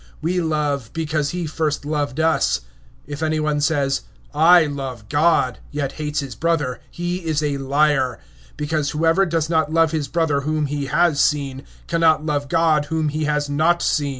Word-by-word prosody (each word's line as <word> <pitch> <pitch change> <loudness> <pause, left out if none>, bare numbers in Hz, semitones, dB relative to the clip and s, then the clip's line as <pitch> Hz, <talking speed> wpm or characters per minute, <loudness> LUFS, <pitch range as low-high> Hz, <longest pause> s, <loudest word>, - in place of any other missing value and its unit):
(19)We 170 0 0
love, 145 -5 -1
because 155 -2 -1
he 175 +1 -3
first 155 -2 -2
loved 145 -2 -2
us. 160 0 +2 0.5
(20)If 145 +1 -6
any 155 0 0
one 150 -1 0
say, 145 -2 +1 0.5
I 165 +3 +6
love 135 -6 -6
God, 145 -4 +2 0.2
and 140 -2 -1
hates 150 0 -3
his 135 -3 -6
brother, 145 -2 -1
he 175 +1 -3
is 160 -4 -2
a 145 -2 -1
liar; 135 -2 +1 0.4
for - - -4
he - - 0
that 160 +4 +1
loves 165 -2 +1
not 160 0 +2
his 155 -3 -2
brother 150 -1 0
whom 155 +1 -1
he 145 -1 -3
has 150 0 +2
seen, 140 -3 0 0.3
how 165 - -1
can - - -2 0.2
he - - -13
love 145 -2 -1
God 160 -2 +2
whom 160 0 -1
he 155 +1 -2
has 150 -1 0
not 160 +4 +1
seen? 145 -3 +1
150 Hz, 180 wpm, -21 LUFS, 145-160 Hz, 0.5 s, I